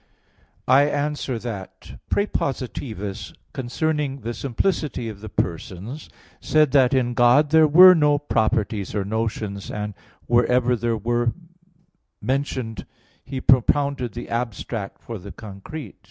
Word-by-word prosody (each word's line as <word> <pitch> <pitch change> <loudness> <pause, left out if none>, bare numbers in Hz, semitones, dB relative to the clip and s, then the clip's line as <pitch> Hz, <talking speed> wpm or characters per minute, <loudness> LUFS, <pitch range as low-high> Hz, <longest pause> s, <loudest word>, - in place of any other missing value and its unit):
I 135 +3 +6
answer 145 -3 -2
that, 110 -5 -8
Prepositivus, 125 - -3 0.2
considering 140 +2 -2
the 120 +1 -4
simplicity 135 -2 -2
of 100 -2 -9
the 110 - -7
persons, 95 - -4 0.3
said 155 -3 +3
that 135 -2 +4
in 120 -2 +1
God 125 +5 +4
there 160 -1 +6
were 180 +5 +9
no 150 -3 +3
properties 110 -7 -1
or 100 -2 -1
notions, 105 -2 -3
and 105 0 -4 0.3
wherever 125 +1 +3
there 115 0 -1
were 120 +2 0 0.9
mentioned, 130 -6 -3 0.4
he 135 - -5
propounded 130 -1 +2
the - - -7
abstract 115 -3 -4
for 115 -3 -6
the 100 +2 -10
concrete. 110 +9 -9
120 Hz, 120 wpm, -23 LUFS, 110-145 Hz, 0.9 s, were